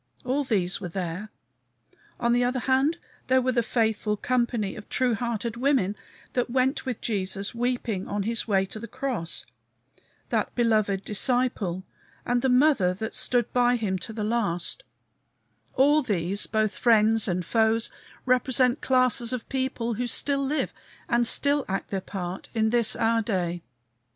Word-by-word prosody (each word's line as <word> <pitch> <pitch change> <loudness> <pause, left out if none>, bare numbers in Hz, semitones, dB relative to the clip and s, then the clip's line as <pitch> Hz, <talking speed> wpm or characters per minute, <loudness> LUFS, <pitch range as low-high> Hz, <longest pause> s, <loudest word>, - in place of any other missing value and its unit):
All 270 +3 0
these 195 -8 0
were 180 - -4
there. 180 +3 -4 0.9
On 235 0 +2
the 245 0 +3
other 250 +1 0
hand, 270 +6 +2 0.3
there 260 0 +4
were 255 0 +1
the 240 -1 +2
faithful 220 -2 0
company 235 -4 0
of 210 - -11
true 255 -2 +1
hearted 235 0 -2
women 245 -7 +1 0.4
that 245 -1 0
went 260 +2 0
with 250 -4 -3
Jesus 200 -1 -2
weeping 235 -5 -2
on 205 0 -2
his 230 +3 -1
way 195 -3 +2
to 205 +3 -8
the 230 - -7
cross; 235 -13 -3 0.8
that - - -1
beloved 215 -5 +1
disciple 210 -5 0 0.4
and 245 0 +1
the 265 - +1
Mother 250 -9 +4
that 220 +4 -5
stood 240 -2 +1
by 245 0 +3
him 200 -5 -1
to 200 - -6
the 215 -1 -4
last; 210 -6 -1 0.9
all 290 +3 +5
these, 200 - -1
both 215 -2 0
friends 225 -2 +4
and 180 -2 -1
foes, 225 +2 +1 0.3
represent 255 0 +2
classes 255 -2 +2
of 250 -3 -4
people 260 -3 -1
who 245 +3 -2
still 275 +3 +1
live 295 +3 -1 0.3
and 235 0 +2
still 285 +2 +4
act 195 - -3
their 195 -1 -1
part 185 -1 -6
in 220 -1 +2
this 235 -2 +1
our 230 0 +2
day. 180 -6 -2
230 Hz, 155 wpm, -26 LUFS, 205-250 Hz, 0.9 s, all